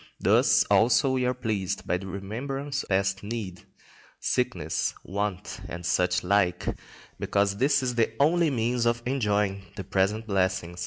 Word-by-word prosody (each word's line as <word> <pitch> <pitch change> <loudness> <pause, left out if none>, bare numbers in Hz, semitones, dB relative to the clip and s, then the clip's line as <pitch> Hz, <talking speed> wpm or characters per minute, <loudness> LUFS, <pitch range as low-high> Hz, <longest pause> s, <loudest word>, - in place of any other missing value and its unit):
Thus - - +4
also 125 +4 +3
we 130 -1 +1
are 125 - +1
pleased 110 -6 -2
by 90 - 0
the 95 - -8
remembrance 135 +9 -4
of - - -12
past 95 0 +1
need, 100 -4 -6 0.5
sickness, - - -1
want, 100 -1 -4
and 85 0 -6
such 90 0 +1
like, 90 -2 +1 0.5
because 100 0 +1
this 140 +2 +2
is 125 -1 0
the 115 -2 +1
only 165 +3 +4
means 120 -2 0
of 120 0 0
enjoying 105 -6 0
the 95 - -5
present 100 +3 0
blessings. 95 -4 -1
105 Hz, 150 wpm, -27 LUFS, 95-125 Hz, 0.5 s, Thus